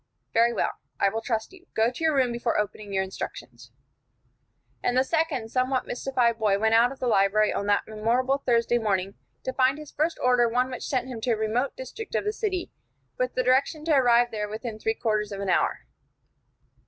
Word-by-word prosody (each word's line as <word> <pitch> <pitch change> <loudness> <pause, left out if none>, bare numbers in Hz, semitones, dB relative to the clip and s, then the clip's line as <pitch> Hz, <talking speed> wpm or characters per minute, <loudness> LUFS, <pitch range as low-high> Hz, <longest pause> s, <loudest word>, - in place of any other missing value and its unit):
"Very 230 +1 +4
well. 230 - 0 0.3
I 200 - +4
will 225 +3 -3
trust 225 +5 -2
you. 370 -1 -17
Go 225 +2 +3
to 255 - -7
your 315 -2 +3
room 255 -3 +2
before 235 0 -1
opening 210 0 -3
your 190 -1 +1
instructions." 190 0 -8 1.1
And 245 0 0
the 260 - +5
second 285 -7 -1
somewhat 255 +1 0
mystified 245 -2 0
boy 210 -2 +2
went 220 +2 +2
out 235 +2 +5
of 270 - -9
the 255 - -3
library 210 -1 +3
on 200 - -2
that 205 0 +3
memorable 240 +5 0
Thursday 240 -2 +2
morning, 195 -3 -1 0.3
to 260 - -3
find 265 +2 +3
his 305 -1 -10
first 320 +3 -1
order 245 -2 +3
one 250 +2 0
which 250 - -5
sent 255 -2 -1
him 240 -3 -6
to 240 0 +1
a - - -1
remote 225 +5 -1
district 455 -3 -7
of - - +1
the 420 - 0
city, 380 -5 -3 0.5
with 255 0 -1
the 255 - +1
direction 270 +5 +2
to 325 - +2
arrive 240 -2 +4
there 210 -1 -3
within 220 +1 -6
three 225 +1 -1
quarters 215 -2 -1
of 200 - -5
an 200 -1 -3
hour. - - +1
240 Hz, 205 wpm, -26 LUFS, 220-260 Hz, 1.1 s, the